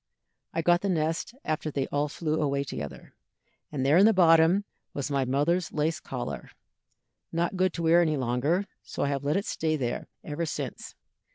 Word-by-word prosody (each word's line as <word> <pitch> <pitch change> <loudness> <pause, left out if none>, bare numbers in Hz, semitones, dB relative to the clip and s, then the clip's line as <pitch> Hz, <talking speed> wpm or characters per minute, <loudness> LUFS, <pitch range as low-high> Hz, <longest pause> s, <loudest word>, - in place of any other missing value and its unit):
I 165 - -2
got 175 +1 +4
the 200 - -1
nest 165 +6 -1
after 155 0 -1
they 140 -2 -1
all 145 +1 0
flew 155 +1 -2
away 140 -1 +1
together, 75 - -7 0.6
and 135 -3 -2
there 145 +4 +5
in 200 - +7
the 225 - +5
bottom 170 +2 +5 0.3
was 140 0 -3
my 135 -2 +1
mother's 150 +7 +1
lace 155 +2 0
collar, - - -5 0.8
not 170 +3 0
good 185 0 +2
to 170 - -4
wear 165 +2 +5
any 155 -3 +1
longer, 135 +9 +1 0.2
so - - -4
I 140 - +1
have 140 -1 -2
let 145 +4 +1
it 200 - -1
stay 155 -1 0
there 125 -5 -3 0.2
ever 160 +2 -3
since. - - -5
155 Hz, 185 wpm, -28 LUFS, 140-170 Hz, 0.8 s, in